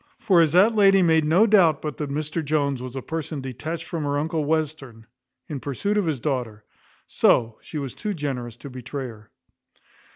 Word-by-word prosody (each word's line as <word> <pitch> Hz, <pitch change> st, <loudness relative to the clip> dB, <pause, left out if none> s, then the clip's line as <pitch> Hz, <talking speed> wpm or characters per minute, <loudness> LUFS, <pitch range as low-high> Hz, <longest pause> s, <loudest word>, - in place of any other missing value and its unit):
For 185 Hz, -6 st, +4 dB
as 160 Hz, -2 st, +2 dB
that 200 Hz, +6 st, +5 dB
lady 195 Hz, -3 st, +5 dB
made 160 Hz, -2 st, +3 dB
no 170 Hz, +8 st, +5 dB
doubt 180 Hz, -9 st, +4 dB
but 150 Hz, -2 st, -4 dB
that 150 Hz, -2 st, -4 dB
Mr 155 Hz, +3 st, -3 dB
Jones 140 Hz, -3 st, 0 dB
was 130 Hz, 0 st, -7 dB
a 135 Hz, -, -5 dB
person 160 Hz, -2 st, -4 dB
detached 155 Hz, +5 st, -5 dB
from 165 Hz, -2 st, -4 dB
her 145 Hz, 0 st, -1 dB
uncle 160 Hz, +1 st, -1 dB
Western, 145 Hz, -7 st, -3 dB, 0.4 s
in 145 Hz, -3 st, -5 dB
pursuit 145 Hz, -, -2 dB
of 205 Hz, -4 st, +1 dB
his 150 Hz, -5 st, -1 dB
daughter, 120 Hz, -6 st, -3 dB, 0.4 s
so 115 Hz, -2 st, +2 dB
she 155 Hz, -, -8 dB
was 140 Hz, -4 st, -4 dB
too 210 Hz, -2 st, -4 dB
generous 125 Hz, -6 st, -4 dB
to 140 Hz, -, -10 dB
betray 130 Hz, +2 st, -6 dB
her. 110 Hz, -1 st, -14 dB
150 Hz, 190 wpm, -24 LUFS, 130-165 Hz, 0.4 s, that